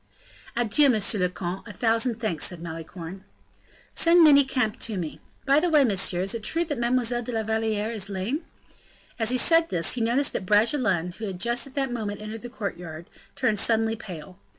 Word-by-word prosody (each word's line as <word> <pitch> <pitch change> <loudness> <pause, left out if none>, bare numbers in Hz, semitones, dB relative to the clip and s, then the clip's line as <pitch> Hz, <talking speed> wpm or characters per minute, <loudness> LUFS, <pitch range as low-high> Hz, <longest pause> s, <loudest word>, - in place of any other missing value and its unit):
"Adieu, 240 +5 +4
monsieur 215 -3 +2
le 180 0 +2
comte; 180 +3 -5
a - - -7
thousand 230 +3 +1
thanks," 215 -9 -2
said 180 - -7
Malicorne. 165 +2 -8 0.7
"Send 335 0 +5
Manicamp 270 -6 +3
to 220 -3 -3
me. 165 -4 -5 0.2
By 275 +1 +5
the 350 +3 +1
way, 305 -3 +5
monsieur, 195 -6 +1
is 195 +1 -1
it 230 - -4
true 330 +11 +2
that 290 -6 -3
Mlle. 240 0 +1
de 245 - -5
la 225 -2 -1
Valliere 220 0 -1
is 205 -3 -4
lame?" 205 - -3 0.8
As 225 -1 +1
he 255 - +2
said 330 +5 +3
this, 165 -2 0
he 245 - -2
noticed 240 +5 +1
that 185 - -4
Bragelonne, 210 - +2
who 220 - -4
had 185 -2 -6
just 235 +4 0
at 270 - -15
that 270 -2 0
moment 210 -3 -4
entered 215 +1 -7
the 245 - -8
courtyard, 175 -8 -7 0.2
turned 240 -6 +1
suddenly 225 0 +1
pale. 185 -4 -10
225 Hz, 195 wpm, -25 LUFS, 190-250 Hz, 0.8 s, Send